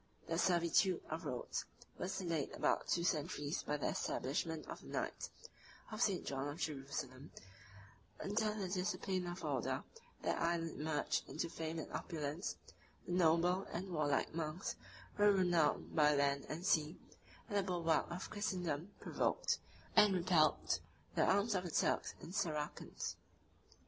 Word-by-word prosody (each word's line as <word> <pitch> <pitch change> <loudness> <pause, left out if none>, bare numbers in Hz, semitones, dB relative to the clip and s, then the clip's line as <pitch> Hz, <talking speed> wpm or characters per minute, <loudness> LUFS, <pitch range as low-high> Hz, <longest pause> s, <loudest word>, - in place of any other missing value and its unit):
The 165 0 -1
servitude 175 +1 +3
of 160 +1 -3
Rhodes 125 - -2 0.4
was 190 +2 -2
delayed 170 -6 -1
about - - +1
two 170 - +2
centuries 150 -3 0
by 150 - -1
the 145 - 0
establishment 155 +4 -1
of - - -7
the - - -13
knights - - -3 0.6
of 215 +1 -4
St. 195 -6 +2
John 135 0 -2
of 145 +2 -4
Jerusalem: 135 -1 -4 0.9
46 205 +3 0
under 215 0 0
the 185 - -2
discipline 185 -1 -1
of 175 +1 -5
the - - -5
order, - - 0 0.4
that - - 0
island 165 -1 0
emerged 150 -1 0
into 165 +2 -2
fame 160 0 -3
and 160 - -5
opulence; 155 +1 -3 0.5
the - - -5
noble 175 +2 +4
and 185 +2 -4
warlike 150 -4 +1
monks 160 +2 -2 0.4
were 205 0 +7
renowned 175 -6 +2
by 150 -1 +6
land 140 0 +2
and 165 +4 -4
sea: 160 -3 +3 0.5
and 205 - -4
the 200 - +4
bulwark 175 -4 +1
of 175 +2 -5
Christendom 185 -4 -2
provoked, - - +1 0.4
and 210 -2 +7
repelled, 155 - +3 0.3
the - - +3
arms 200 +3 +3
of 185 -2 +1
the 175 - -4
Turks - - +1
and 165 - -9
Saracens. 155 -6 -2
170 Hz, 150 wpm, -38 LUFS, 150-185 Hz, 0.9 s, were